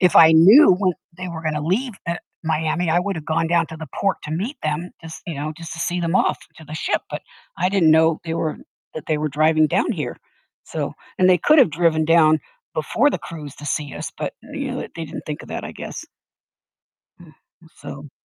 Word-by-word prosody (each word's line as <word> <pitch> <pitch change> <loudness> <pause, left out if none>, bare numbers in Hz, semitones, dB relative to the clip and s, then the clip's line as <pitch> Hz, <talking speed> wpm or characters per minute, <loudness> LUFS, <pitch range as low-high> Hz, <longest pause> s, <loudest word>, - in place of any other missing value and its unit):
If 180 -3 +4
I 160 0 +9
knew 190 - +8
when 185 0 +1 0.2
they 185 0 -5
were 165 -2 -6
gonna 155 -1 -1
leave, 210 - -1
eh, 170 0 -1 0.3
Miami, 160 +1 0
I 170 - +4
would 195 +2 -2
have 160 - -6
gone 160 +1 0
down 170 0 +2
to 160 - -8
the 160 -1 -8
port 195 -3 +1
to 150 - -6
meet 200 - -3
them 155 +3 -2
just 160 0 -9
you 170 - -4
know, 150 +2 -4
just 165 -1 -8
to - - -9
see 175 +2 -1
them 170 +2 +1
off - - +2 0.2
to 160 - -13
the 155 - -8
ship, 160 - -1
but - - -5 0.4
I 180 - +2
didn't 185 -5 +4
know 160 0 +4
they 165 -1 -3
were 160 -2 -2 0.4
that 155 - -6
they 155 - 0
were 155 0 -1
driving 155 +2 +3
down 185 +8 +1
here. 150 - -4 0.5
So - - -4 0.3
and 185 - +5
they 180 -1 +5
could 305 - +4
have 255 - +6
driven 160 0 +2
down 155 -1 +5 0.3
before 225 - +2
the - - -2
cruise 150 -5 -9
to 145 - -9
see 145 -1 -2
us, - - -6
but, - - -3 0.2
uh, - - -12
you - - -3
know, - - -4
they - - -6
they 165 - -4
didn't 150 0 -8
think 150 -1 -5
of - - -13
that, - - -5
I - - -6
guess. - - -7 1.1
Mm, 170 -3 -16 0.3
m 165 - -18
so 145 0 -9
160 Hz, 235 wpm, -21 LUFS, 155-180 Hz, 1.1 s, I